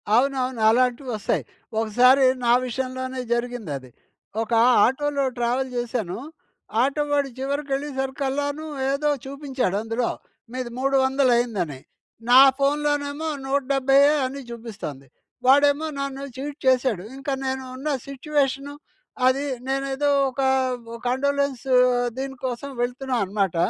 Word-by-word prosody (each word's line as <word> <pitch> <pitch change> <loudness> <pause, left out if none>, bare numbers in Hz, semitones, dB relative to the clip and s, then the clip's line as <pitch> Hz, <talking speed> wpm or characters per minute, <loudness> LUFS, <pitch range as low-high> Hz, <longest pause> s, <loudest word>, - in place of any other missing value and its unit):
అవునవును. 255 -2 +1
అలాంటివొస్తాయి. 245 -1 0 0.4
ఒకసారి 250 +5 +5 0.2
నా 235 - +4
విషయంలోనే 260 +1 -3
జరిగిందది. 220 - -4 0.5
ఒక 225 - -5 0.3
ఆటోలో 280 +2 0
ట్రావెల్ 245 +2 0
జేశాను. 235 -6 -2 0.6
ఆటో 280 +3 +1
వాడు 285 -1 +1
చివరికెళ్ళే 280 +1 -2
సరికల్లాను 280 +3 -2 0.3
ఏదో 295 +2 +1 0.2
చూపించాడందులో, 250 -5 -2 0.4
మీది 255 -1 -4
మూడు 275 +1 +1
వందలయిందని. 240 - +1 0.5
నా 250 +1 +9 0.2
ఫోన్‌లోనేమో 290 +1 0 0.2
నూట 275 +1 +1
డెబ్బైయ్యే 275 +2 +5
అని 270 +2 -5
చూపిస్తొంది. 200 - -7 0.4
వాడేమో 285 +3 +4
నన్ను 275 0 -4
చీట్ 285 +2 -6
చేసాడు. 255 -7 +2
ఇంక 270 - -12 0.2
నేను 265 0 -2
ఉన్న 275 +4 -4 0.2
సిట్యుయేషను, 275 0 -1 0.5
అది, 275 +3 +2 0.2
నేనేదో 275 +1 0 0.2
ఒక 265 +1 -4 0.5
ఒ - - -5
కండోలెన్సు 275 0 0 0.4
దీనికోసం 265 -1 -4
వెళ్తున్నా 250 +2 -2
అనమాట. 195 -2 -1
265 Hz, 105 wpm, -24 LUFS, 245-280 Hz, 0.6 s, నా